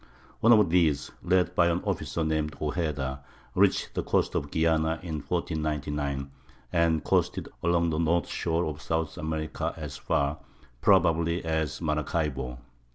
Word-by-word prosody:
One 115 - +5
of 105 -7 +6
these, 80 -5 +2
led 90 -1 +2
by 85 - +4
an 85 +1 0
officer 85 - -2
named 80 -1 -1
Ojeda, 75 -4 -2 0.3
reached - - +2
the - - -1
coast - - +1
of 70 - -2
Guiana 80 0 +2
in 80 -3 -3
1499, 75 -5 -2 0.4
and 85 -2 +2
coasted - - +1
along 85 -1 +2
the 80 - -1
north 85 +1 +2
shore 85 +1 -1
of 75 0 -5
South 80 -2 -2
America 80 0 -3
as 75 -3 -6
far, 70 +2 0 0.4
probably, 85 0 +3
as 80 +1 -1
Maracaibo. 75 -5 -1
80 Hz, 140 wpm, -28 LUFS, 75-85 Hz, 0.4 s, of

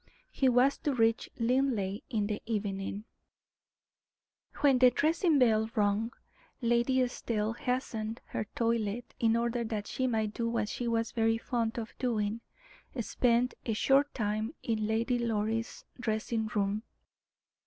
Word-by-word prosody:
He 265 - +2
was 250 +3 +3
to 285 -3 -1
reach 225 -1 +2
Linleigh 230 -5 +1
in 215 -5 0
the 210 0 -3
evening. 200 -2 -2 1.6
When 275 -3 +5
the 250 0 +8
dressing 315 +5 +2
bell 220 -4 +3
rung, 210 +2 +1 0.5
Lady 240 +1 +2
Estelle 225 -3 -2
hastened 230 -3 -3
her - - -3
toilet, 230 0 -1
in 230 0 +3
order 235 0 0
that 220 -2 -3
she 260 +4 -1
might 220 -3 0
do 230 +1 -1
what 225 -2 -1
she 245 - -3
was 230 0 0
very 225 -1 +2
fond 230 -1 -2
of 230 -1 -5
doing 225 -3 -1 0.6
spend 240 +2 +2
a 225 - +1
short 275 +6 +3
time 215 +4 -1
in 215 -2 0
Lady 230 +3 +1
Doris' 225 0 -2
dressing 220 -1 -1
room. 205 0 0
230 Hz, 135 wpm, -31 LUFS, 215-245 Hz, 1.6 s, the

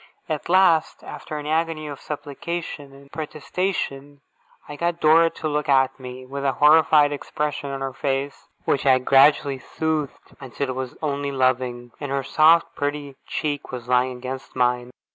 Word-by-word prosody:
At 155 +1 -4
last, 180 -3 +3
after 155 - -7
an 145 - -6
agony 160 0 -1
of 145 -2 -7
supplication 150 0 -6
and 140 0 -17
protestation, 145 -2 -4 0.5
I 150 - -7
got 170 +2 -1
Dora 165 +2 +5
to 160 - -5
look 150 -1 -2
at 135 0 +3
me, 130 0 -9
with 140 +2 -6
a 135 -1 +1
horrified 150 0 +5
expression 145 0 -3
of 135 -1 -5
face, 140 0 -3 0.2
which 140 - 0
I 130 -1 +6
gradually 140 +1 +4
soothed 155 +1 -3
until 135 +1 -4
it 130 - -3
was 130 -1 -5
only 140 -1 -1
loving, 125 -2 0
and 145 -2 -5
her 140 0 -1
soft, 160 +5 +4
pretty 145 -1 -3
cheek 145 -2 -3
was 125 -2 -7
lying 125 0 +1
against 130 +1 -7
mine. 125 -1 +1
140 Hz, 160 wpm, -23 LUFS, 130-155 Hz, 0.5 s, I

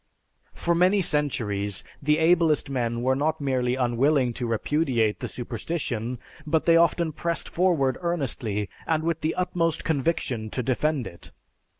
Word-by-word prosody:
For 170 - 0
many 185 +3 +3
centuries 105 - -1 0.2
the 150 +2 +2
ablest 160 -3 +3
men 120 -2 -1
were 130 +1 +2
not 155 +3 0
merely 130 -3 0
unwilling 130 +1 +2
to 120 0 -3
repudiate 115 -2 0
the - - -4
superstition, 120 -1 -4 0.3
but 155 0 0
they 165 - +5
often 170 0 +3
pressed 170 +2 -3
forward 165 -8 +1
earnestly 130 - -2 0.2
and 160 -1 +1
with 165 -1 -1
the 160 - -1
utmost 170 -3 0
conviction 135 -7 -1
to 125 - -3
defend 135 +2 0
it. 85 - -10
145 Hz, 140 wpm, -25 LUFS, 120-165 Hz, 0.3 s, they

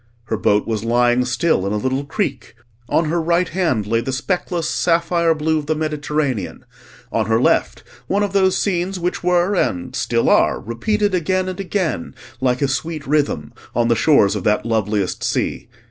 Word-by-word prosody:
Her 110 - 0
boat 105 0 +2
was 110 -2 -2
lying 120 +1 +2
still 125 - +1
in 100 - -1
a - - 0
little 130 +5 -1
creek; 200 - -3 0.3
on 165 - +2
her 165 +2 0
right 170 +2 +1
hand 160 - 0
lay 115 +2 +1
the 130 - -3
speckless 170 +4 -2
sapphire 170 0 +1
blue 155 +1 0
of 145 - -8
the 155 - +1
Mediterranean; 150 - -2 0.5
on 110 -2 0
her 110 0 +2
left - - +1 0.2
one 200 +2 +1
of 200 -1 -2
those 190 -2 +3
scenes 185 -1 -1
which 175 +1 -2
were 180 +2 +2
and 90 - -1
still - - 0
are - - +3
repeated 205 - -1
again 185 +2 0
and 185 +1 -5
again 185 - -2 0.2
like 130 +1 +1
a - - +3
sweet 155 +2 -3
rhythm, 140 - 0 0.2
on 120 0 +2
the 115 - +4
shores 110 -8 +4
of 100 - -3
that 105 +1 +1
loveliest 105 -4 -1
sea. - - -2
150 Hz, 180 wpm, -20 LUFS, 115-175 Hz, 0.5 s, the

